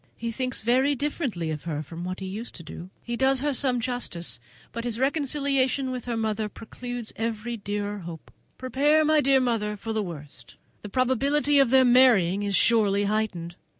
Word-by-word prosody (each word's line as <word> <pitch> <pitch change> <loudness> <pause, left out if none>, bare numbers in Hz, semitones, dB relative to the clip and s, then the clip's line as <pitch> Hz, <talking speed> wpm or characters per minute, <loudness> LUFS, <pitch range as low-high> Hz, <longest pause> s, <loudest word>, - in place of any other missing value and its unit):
He 230 0 -3
thinks 255 0 -3
very 260 +5 +3
differently 255 - -2
of 150 -1 -6
her 155 -2 -3
from 165 +4 -8
what 185 +1 -5
he - - -4
used 210 +5 -6
to 165 - -9
do; 170 +3 -9
he 235 - -3
does 265 +1 +2
her 290 0 0
some 255 -2 +1
justice, 230 - -3 0.3
but 230 - -5
his 235 -2 -2
reconciliation 275 -1 0
with 250 -2 -5
her 240 -2 -2
mother 220 -1 -1
precludes 240 +2 -7
every 230 +1 -3
dearer 205 -1 -4
hope. 170 -3 -9 0.3
Prepare, 290 +5 +2
my 310 0 +4
dear 270 -1 +4
mother, 220 -4 -1
for 225 +2 -5
the 220 - 0
worst! 155 -7 -9 0.3
The 210 - -8
probability 275 +5 +2
of 270 -3 +4
their 260 +1 +6
marrying 235 -7 +5
is 200 -1 0
surely 205 -1 +4
heightened! 200 -5 -2
235 Hz, 185 wpm, -26 LUFS, 200-260 Hz, 0.3 s, their